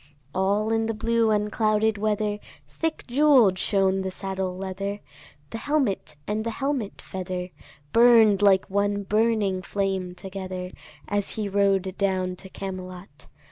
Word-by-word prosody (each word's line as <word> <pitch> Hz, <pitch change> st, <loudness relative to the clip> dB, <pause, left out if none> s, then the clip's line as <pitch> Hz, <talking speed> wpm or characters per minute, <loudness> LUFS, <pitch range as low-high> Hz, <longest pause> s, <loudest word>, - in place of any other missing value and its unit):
All 200 Hz, +3 st, +1 dB
in 225 Hz, 0 st, +1 dB
the 225 Hz, -, -2 dB
blue 230 Hz, 0 st, +1 dB
unclouded 215 Hz, 0 st, +1 dB
weather 210 Hz, 0 st, 0 dB, 0.3 s
Thick 325 Hz, -1 st, -3 dB
jewell'd 250 Hz, -8 st, +4 dB
shone 195 Hz, -1 st, +2 dB
the 190 Hz, -, -2 dB
saddle 190 Hz, -1 st, -4 dB
leather, 195 Hz, +2 st, -4 dB, 0.5 s
The 225 Hz, -, -4 dB
helmet 265 Hz, -, 0 dB
and 215 Hz, +1 st, -2 dB
the 230 Hz, -, -2 dB
helmet 265 Hz, -3 st, -3 dB
feather 185 Hz, -1 st, -5 dB, 0.4 s
Burn'd 230 Hz, -4 st, +6 dB
like 195 Hz, -2 st, +5 dB
one 200 Hz, +1 st, 0 dB
burning 210 Hz, -2 st, +1 dB
flame 190 Hz, -2 st, -2 dB
together, 185 Hz, -1 st, -6 dB, 0.4 s
As 205 Hz, -1 st, -1 dB
he 215 Hz, -2 st, -2 dB
rode 195 Hz, -1 st, +1 dB
down 185 Hz, -2 st, 0 dB
to 190 Hz, -, -9 dB
Camelot. 185 Hz, -1 st, -8 dB
200 Hz, 135 wpm, -25 LUFS, 190-220 Hz, 0.5 s, Burn'd